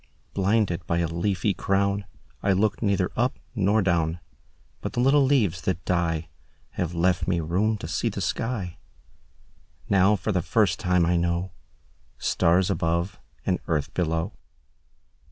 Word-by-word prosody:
Blinded 100 -3 +1
by 85 - +1
a 85 - +1
leafy 95 +4 0
crownI 100 +1 0 0.4
looked 100 +2 +2
neither 100 -4 +1
up 125 +3 0 0.2
nor 105 -1 +2
down—But 85 -2 -4
the - - -2
little 135 +3 +5
leaves 110 - +2
that 90 0 -2
dieHave 80 0 -3
left 85 0 +1
me 90 -2 +1
room 95 +7 +1
to - - -7
see - - 0
the - - -5
sky; 105 -7 -2 1.1
Now 100 +1 +5
for 105 +3 -2
the 90 -3 +1
first 95 -1 +2
time 90 -3 +2
I 85 +1 +2 1.0
knowStars 90 +2 +2
above 85 +4 -1 0.3
and 90 - +1
earth 75 -4 -1
below. 80 +3 -1
90 Hz, 130 wpm, -25 LUFS, 85-100 Hz, 1.1 s, little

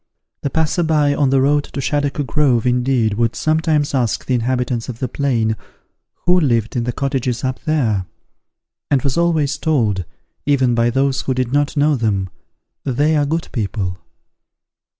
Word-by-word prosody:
The 140 - -1
passer 160 +3 0
by 150 -3 +2
on 140 -2 +2
the 135 0 +3
road 145 +1 +2
to 140 - -7
Shaddock 145 +1 -1
Grove, 130 -2 +2
indeed, 125 -3 +2
would 115 +2 0
sometimes 155 -2 +1
ask 125 -5 0
the 130 - -1
inhabitants 125 0 -1
of 120 - -5
the 130 - -2
plain, 115 -5 0 0.7
who 180 0 +5
lived 115 -8 +1
in 120 -1 0
the 125 - -1
cottages 130 -2 -2
up 130 -1 -2
there? 115 -12 +1 0.8
and 140 -3 +2
was 135 -2 0
always 155 -4 +1
told, 110 - +1 0.4
even 130 -4 +3
by 115 0 +2
those 135 +2 +1
who 130 - -2
did 130 0 -1
not 145 +1 +1
know 145 +1 +3
them, 100 -6 -1 0.5
"They 145 +4 +1
are 145 -1 +2
good 160 +2 -2
people." 100 -5 -3
135 Hz, 165 wpm, -19 LUFS, 120-145 Hz, 0.8 s, who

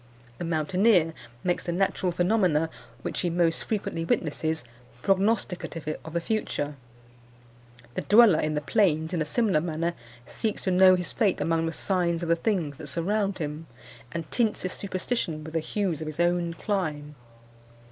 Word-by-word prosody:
The 175 - -3
mountaineer 170 +2 +3 0.3
makes 175 -1 0
the 175 - -1
natural 185 0 +1
phenomena 175 -3 +2 0.3
which - - -3
he 175 - 0
most 170 -1 +1
frequently 195 -6 -2
witnesses 160 -1 -1 0.4
prognosticative 190 -6 0
of 160 - -9
the 170 - +1
future. 160 -8 -2 1.2
The - - -2
dweller 210 -5 +6
in 155 0 0
the 150 - 0
plains, 160 -1 +2
in 170 - 0
a - - +1
similar 190 -1 +2
manner, 170 +1 -1 0.3
seeks 220 - -3
to 190 - +1
know 185 0 +7
his 180 -1 -3
fate 205 -5 +1
among 165 +2 +1
the - - -1
signs 175 -1 0
of 170 - -3
the 170 - +5
things 165 -6 -1
that 150 - -8
surround 195 +6 0
him, 155 -1 -5 0.4
and 165 -1 -4
tints 225 -4 +1
his 185 - -2
superstition 185 -5 -2
with 160 +1 -9
the 165 - +2
hues 175 -1 -2
of 155 - -4
his 155 +1 -6
own 175 -1 +1
clime. 155 -7 -2
170 Hz, 165 wpm, -27 LUFS, 160-190 Hz, 1.2 s, know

